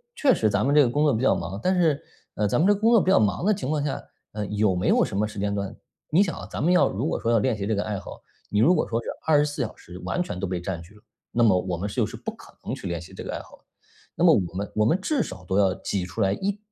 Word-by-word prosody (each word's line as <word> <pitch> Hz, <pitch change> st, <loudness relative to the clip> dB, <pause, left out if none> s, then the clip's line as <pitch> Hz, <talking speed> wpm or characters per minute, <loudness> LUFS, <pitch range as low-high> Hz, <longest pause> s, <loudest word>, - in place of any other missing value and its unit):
确 270 Hz, -4 st, +4 dB
实 110 Hz, -, +2 dB
咱 100 Hz, +4 st, +1 dB
们 140 Hz, -, +2 dB
这 150 Hz, -, +7 dB
个 125 Hz, -, +3 dB
工 145 Hz, +5 st, +1 dB
作 145 Hz, -, +4 dB
比 115 Hz, -, -2 dB
较 135 Hz, -, +4 dB
忙， 100 Hz, +1 st, -5 dB
但 185 Hz, +1 st, +2 dB
是， 155 Hz, -4 st, +2 dB, 0.3 s
呃， 105 Hz, -, +1 dB
咱 -, -, +1 dB
们 180 Hz, -, +4 dB
这 205 Hz, -, +6 dB
个 200 Hz, -, -4 dB
工 225 Hz, +2 st, +4 dB
作 230 Hz, -3 st, +6 dB
比 185 Hz, -, +2 dB
较 -, -, +6 dB
忙 105 Hz, -, +1 dB
的 215 Hz, -, +4 dB
情 130 Hz, -8 st, -4 dB
况 150 Hz, -1 st, 0 dB
下， 145 Hz, -, -3 dB, 0.3 s
呃， 105 Hz, -1 st, -3 dB
有 105 Hz, -2 st, +1 dB
没 90 Hz, -, -1 dB
有 -, -, +4 dB
什 -, -, -6 dB
么 105 Hz, +1 st, +1 dB
时 105 Hz, -, -10 dB
间 100 Hz, 0 st, -1 dB
段 100 Hz, -1 st, -3 dB, 0.4 s
你 175 Hz, +5 st, +5 dB
想 175 Hz, -, -3 dB
啊， 95 Hz, -, -8 dB
咱 115 Hz, -, -4 dB
们 175 Hz, -, +3 dB
要 180 Hz, -, +5 dB
如 115 Hz, +10 st, -2 dB
果 -, -, -1 dB
说 115 Hz, -, 0 dB
要 115 Hz, -, +4 dB
练 120 Hz, +1 st, +1 dB
习 100 Hz, -, -3 dB
这 110 Hz, -, 0 dB
个 100 Hz, -, -1 dB
爱 105 Hz, -3 st, -3 dB
好， -, -, -10 dB, 0.3 s
你 105 Hz, -, 0 dB
如 165 Hz, +11 st, +5 dB
果 155 Hz, -, 0 dB
说 115 Hz, 0 st, -1 dB
是 -, -, -6 dB, 0.2 s
24 150 Hz, -3 st, +2 dB
小 110 Hz, -, -6 dB
时 90 Hz, -, -12 dB
完 180 Hz, -, -1 dB
全 90 Hz, -, -4 dB
都 95 Hz, -, -1 dB
被 90 Hz, -1 st, -3 dB
占 85 Hz, -2 st, -4 dB
据 85 Hz, +5 st, -15 dB
了， 105 Hz, -, -19 dB, 0.3 s
那 120 Hz, -, +2 dB
么 95 Hz, -5 st, +5 dB
我 90 Hz, -1 st, -3 dB
们 100 Hz, +4 st, -3 dB
是 -, -, -8 dB
就 -, -, +2 dB
是 -, -, -8 dB
不 -, -, -5 dB
可 -, -, -17 dB
能 -, -, -4 dB
去 95 Hz, -, -6 dB
练 85 Hz, -1 st, -3 dB
习 85 Hz, -, -13 dB
这 -, -, -8 dB
个 -, -, -5 dB
爱 -, -, -3 dB
好 -, -, -16 dB
的。 -, -, -34 dB, 0.5 s
那 -, -, -1 dB
么 -, -, +7 dB
我 85 Hz, -3 st, 0 dB
们 100 Hz, +2 st, -4 dB
我 105 Hz, -, +3 dB
们 140 Hz, +11 st, +3 dB
至 280 Hz, +4 st, 0 dB
少 95 Hz, -, -9 dB
都 95 Hz, -, -1 dB
要 95 Hz, -2 st, +3 dB
挤 95 Hz, -3 st, -3 dB
出 90 Hz, +5 st, -5 dB
来 95 Hz, -1 st, +3 dB
一 200 Hz, -, -2 dB
110 Hz, 350 characters per minute, -25 LUFS, 100-150 Hz, 0.5 s, 这